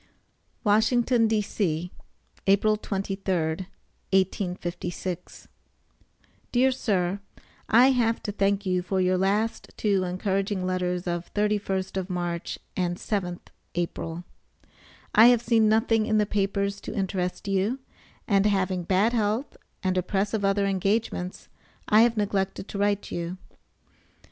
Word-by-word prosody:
WASHINGTON, 230 +2 +3
D.C., 190 -6 -1 0.6
April 200 +2 +4
23d, 190 -4 -2 0.4
1856. 180 -2 -2 1.0
DEAR 255 +2 +4
SIR: 195 -6 0 0.5
I 250 +4 +6
have 230 -3 +1
to 205 - -2
thank 200 0 0
you 185 -1 +1
for 190 +1 -1
your 185 0 +2
last 205 +4 0
two 200 -3 +1
encouraging 190 +1 -1
letters 180 -1 -1
of 175 -1 -3
31st 205 -2 0
of 190 0 -3
March 175 -2 -3 0.2
and 175 -1 -1
7th 180 -5 -3 0.3
April. 170 -1 -3 0.9
I 220 +3 +8
have 240 -1 +5
seen 225 -2 +4
nothing 220 0 +2
in 215 - +2
the 210 - +3
papers 200 0 -1
to - - -6
interest 190 0 -2
you, 195 +6 +1 0.5
and 200 -1 +3
having 190 -2 +1
bad 195 +6 +2
health 220 +4 0 0.3
and 185 -1 +1
a - - +1
press 195 +3 -1
of 215 -2 -1
other 200 0 +2
engagements, 195 -1 -1 0.4
I 215 +1 +6
have 235 -1 +3
neglected 195 -1 -1
to 200 - -5
write 205 0 0
you. 175 +2 -4
195 Hz, 125 wpm, -26 LUFS, 185-215 Hz, 1.0 s, I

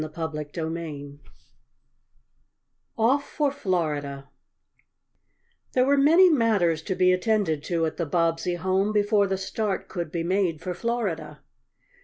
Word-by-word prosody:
CHAPTER 160 0 -4
V 145 -4 -6 1.8
OFF 260 +6 +3
FOR 290 -1 -1
FLORIDA 150 - -2 1.4
There 255 0 +3
were 280 +1 +4
many 320 +7 +6
matters 215 - +2
to 185 - -3
be 185 0 +4
attended 185 -6 0
to 165 -2 0
at 160 - -4
the 170 - -2
Bobbsey 165 +2 0
home 190 +3 0
before 205 -1 +2
the 190 0 -1
start 195 +1 -3
could 170 -4 -4
be 170 -1 -2
made 180 -3 0
for 180 +2 -4
Florida. 175 -10 -3
180 Hz, 125 wpm, -25 LUFS, 160-215 Hz, 1.8 s, many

